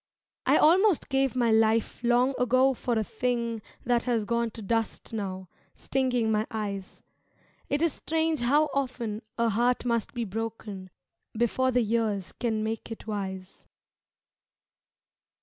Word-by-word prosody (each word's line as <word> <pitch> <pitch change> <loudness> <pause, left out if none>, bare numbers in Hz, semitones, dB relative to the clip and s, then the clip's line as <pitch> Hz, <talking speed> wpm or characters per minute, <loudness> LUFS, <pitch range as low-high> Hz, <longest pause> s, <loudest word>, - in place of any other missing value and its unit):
I - - +6
almost 365 +3 +4
gave 270 -1 +1
my 240 -2 +2
life 220 +1 +2
long 245 +3 +3
ago 255 +2 +4
for 240 -1 -1
a 220 - +1
thing 235 0 -2 0.2
That 240 -1 +2
has 235 -4 +1
gone 235 +1 0
to 220 - -7
dust 225 +2 -2
now, 190 -3 -4 0.3
stinging 250 -4 0
my 215 0 +1
eyes 200 -3 -5 0.7
It 290 +3 +1
is 335 - +2
strange 320 0 0
how 290 +6 +3
often 240 -6 -2 0.2
a 230 -1 +2
heart 240 +4 +1
must 235 0 -1
be 235 -1 -1
broken 210 -2 -5 0.5
Before 240 +3 +2
the 250 -1 +2
years 215 -4 -1
can 220 -3 -2
make 225 +1 -3
it 225 - -7
wise. 190 -3 -5
235 Hz, 140 wpm, -28 LUFS, 220-250 Hz, 0.7 s, I